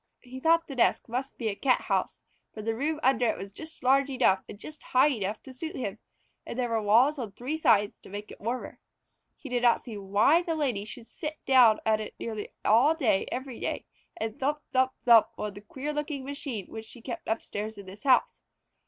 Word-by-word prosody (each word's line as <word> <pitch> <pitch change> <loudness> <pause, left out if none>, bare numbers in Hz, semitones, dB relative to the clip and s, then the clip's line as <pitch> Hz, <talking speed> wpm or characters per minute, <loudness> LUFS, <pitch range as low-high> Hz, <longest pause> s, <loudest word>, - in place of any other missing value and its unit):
He 255 0 -9
thought 330 +3 +3
the 275 - -6
desk 245 - +2
must 255 +4 -4
be 230 - -2
a 200 - -3
Cathouse, 255 +3 +1 0.3
for 215 - -8
the 225 +1 0
room 300 +6 -1
under 250 -2 +3
it - - 0
was 195 0 -7
just 315 +8 -10
large 270 +2 +4
enough 250 -8 +3
and - - -8
just 300 +8 -10
high 260 +4 +4
enough 215 -3 -3
to 265 - -11
suit 315 +5 -6
him, 215 -4 -4 0.4
and - - -7
there 245 -2 0
were 225 -1 0
walls 240 +8 +4
on 220 -6 -5
three 255 +9 -3
sides 225 -10 +3
to - - -13
make 205 +2 -7
it - - -13
warmer. 240 +4 -4 0.6
He - - -11
did 245 -2 -1
not 240 -1 +4
see 220 -5 -6
why 205 - +4
the 335 -2 -2
Lady 250 -10 -1
should 230 +2 -10
sit 305 -1 -6
down 245 -5 +6
at 220 -1 +3
it 215 - -7
nearly 220 -2 -5 0.2
every 255 0 +2
day - - -3 0.3
and 225 -8 -4
thump 295 +3 0
thump 260 0 +2
thump 235 -2 +7
on 210 -1 -4
the 205 - -10
queer 270 +8 -5
looking 295 -1 -3
little 265 - -8
machine 260 -8 -5
which 220 0 -7
she 240 - -12
kept 240 +1 -6
upstairs 220 -1 -3
in 200 - -9
this 190 +2 -11
house. 260 -2 +3
245 Hz, 215 wpm, -28 LUFS, 215-275 Hz, 0.6 s, thump